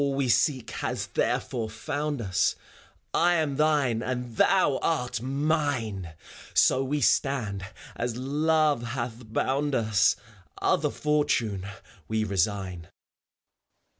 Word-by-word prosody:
FAuar. -, -, +3 dB
All 140 Hz, -, -1 dB
we 135 Hz, -2 st, 0 dB
seek 125 Hz, -4 st, +2 dB
has -, -, -3 dB
therefore 115 Hz, -3 st, -1 dB
found 145 Hz, +5 st, -3 dB
us; 95 Hz, -4 st, +1 dB, 0.6 s
I 175 Hz, +1 st, +4 dB
am 150 Hz, -4 st, 0 dB
thine 145 Hz, -7 st, +2 dB
and 125 Hz, -2 st, -4 dB
thou 150 Hz, -, +3 dB
art 125 Hz, -7 st, -1 dB
mine! 130 Hz, -, -1 dB, 0.4 s
So 130 Hz, -, +4 dB
we 145 Hz, +2 st, -1 dB
stand 110 Hz, -9 st, +1 dB, 0.3 s
as 120 Hz, 0 st, -3 dB
Love 150 Hz, +1 st, +2 dB
hath 120 Hz, -2 st, -5 dB
bound 140 Hz, +4 st, 0 dB
us: 110 Hz, -2 st, +3 dB, 0.4 s
Other 160 Hz, -5 st, +2 dB
fortune 125 Hz, -11 st, 0 dB, 0.4 s
we 110 Hz, 0 st, 0 dB
rasiign. 95 Hz, -3 st, -1 dB
125 Hz, 115 wpm, -27 LUFS, 110-145 Hz, 0.6 s, I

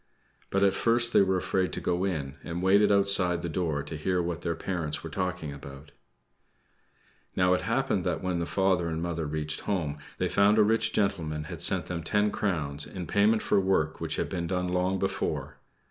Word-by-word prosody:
But 100 Hz, 0 st, +1 dB
at 100 Hz, -, +4 dB
first 115 Hz, 0 st, +2 dB
they -, -, +6 dB
were 95 Hz, -1 st, +2 dB
afraid 95 Hz, 0 st, 0 dB
to -, -, -3 dB
go 90 Hz, +2 st, -1 dB
in, 75 Hz, -7 st, -3 dB
and 85 Hz, +1 st, -4 dB
waited 100 Hz, +2 st, +4 dB
outside 100 Hz, -3 st, +3 dB
the -, -, -2 dB
door 80 Hz, -4 st, -1 dB
to 75 Hz, +2 st, -7 dB
hear 90 Hz, +4 st, -1 dB
what 85 Hz, -1 st, -3 dB
their 85 Hz, -1 st, -2 dB
parents 80 Hz, -4 st, -3 dB
were 80 Hz, -, -7 dB
talking 90 Hz, -5 st, -3 dB
about. 70 Hz, +1 st, -11 dB, 1.4 s
Now, 90 Hz, 0 st, +3 dB
it 90 Hz, -, +1 dB
happened 120 Hz, 0 st, 0 dB
that 85 Hz, -2 st, -2 dB
when 90 Hz, -2 st, -1 dB
the 85 Hz, -, -2 dB
father 95 Hz, -3 st, +1 dB
and 80 Hz, -1 st, -3 dB
mother 85 Hz, -2 st, -3 dB
reached 75 Hz, 0 st, -3 dB
home, 80 Hz, -8 st, -2 dB, 0.2 s
they -, -, 0 dB
found 100 Hz, +2 st, +3 dB
a 110 Hz, -, +6 dB
rich 110 Hz, +2 st, +2 dB
gentleman 80 Hz, -7 st, -1 dB
had 80 Hz, +2 st, -7 dB
sent 90 Hz, -2 st, +4 dB
them 85 Hz, -2 st, -4 dB
ten 105 Hz, +5 st, +1 dB
crowns, 75 Hz, -8 st, -2 dB
in 90 Hz, -3 st, -6 dB
payment 105 Hz, +5 st, +2 dB
for -, -, +2 dB
work 95 Hz, -5 st, 0 dB
which -, -, -2 dB
had -, -, -1 dB
been 85 Hz, -2 st, -3 dB
done 90 Hz, 0 st, -1 dB
long 90 Hz, +1 st, 0 dB
before. 95 Hz, 0 st, -3 dB
90 Hz, 200 wpm, -28 LUFS, 80-95 Hz, 1.4 s, they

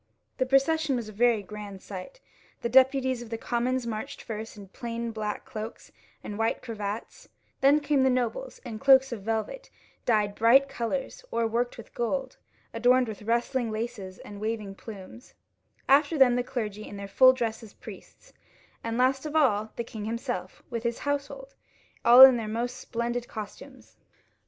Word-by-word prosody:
The 260 Hz, -, +1 dB
procession 275 Hz, +2 st, +2 dB
was 235 Hz, -3 st, -4 dB
a -, -, -10 dB
very 230 Hz, -1 st, +2 dB
grand 205 Hz, 0 st, -8 dB
sight. 195 Hz, -, -8 dB, 0.5 s
Ihe 235 Hz, -, 0 dB
deputies 260 Hz, -1 st, +4 dB
of 240 Hz, -, -9 dB
the 225 Hz, -, -3 dB
commons 245 Hz, +2 st, -1 dB
marched 220 Hz, -2 st, -5 dB
first 220 Hz, 0 st, -6 dB
in 200 Hz, -1 st, -10 dB
plain 235 Hz, +2 st, -5 dB
black 215 Hz, 0 st, -4 dB
cloaks 225 Hz, -4 st, -8 dB, 0.3 s
and 205 Hz, +1 st, -6 dB
white 225 Hz, +2 st, 0 dB
cravats; 215 Hz, -3 st, -6 dB, 0.3 s
then 280 Hz, +2 st, +5 dB
came 290 Hz, -2 st, +1 dB
the 265 Hz, -, +4 dB
nobles, 255 Hz, -, -2 dB
in 225 Hz, -3 st, -6 dB
cloaks 265 Hz, 0 st, +6 dB
of 230 Hz, -4 st, -5 dB
velvet, 225 Hz, -, -3 dB, 0.4 s
dyed 210 Hz, -3 st, +2 dB
bright 240 Hz, +6 st, +5 dB
colours, 270 Hz, -, -4 dB
or 235 Hz, -, 0 dB
worked 235 Hz, +2 st, -1 dB
with 230 Hz, -, -12 dB
gold, 260 Hz, +2 st, -2 dB, 0.4 s
adorned 250 Hz, 0 st, +3 dB
with 215 Hz, -1 st, -7 dB
rustling 235 Hz, +2 st, 0 dB
laces 215 Hz, -4 st, -5 dB
and 205 Hz, 0 st, -10 dB
waving 215 Hz, -2 st, -3 dB
plumes; 210 Hz, +4 st, -11 dB, 0.5 s
after 290 Hz, +3 st, +4 dB
them 255 Hz, -3 st, +6 dB
the 245 Hz, -, +1 dB
clergy 215 Hz, -5 st, -5 dB
in 205 Hz, -, -8 dB
their 200 Hz, 0 st, -6 dB
full 255 Hz, +6 st, +7 dB
dress 230 Hz, -3 st, -3 dB
as 220 Hz, -3 st, -13 dB
priests; -, -, -13 dB, 0.5 s
and 230 Hz, 0 st, -2 dB
last 265 Hz, +3 st, +2 dB
of 305 Hz, -, -7 dB
all 220 Hz, -8 st, +2 dB
the 235 Hz, -, -3 dB
king 220 Hz, -2 st, -7 dB
himself, 225 Hz, -5 st, -4 dB
with 230 Hz, -1 st, -2 dB
his 235 Hz, 0 st, -2 dB
household 285 Hz, -, -3 dB, 0.5 s
all 240 Hz, +2 st, +8 dB
in 260 Hz, -2 st, +9 dB
their 225 Hz, -2 st, -4 dB
most 240 Hz, +3 st, -3 dB
splendid 240 Hz, -1 st, -3 dB
costumes. 215 Hz, -2 st, -10 dB
235 Hz, 170 wpm, -27 LUFS, 215-260 Hz, 0.5 s, in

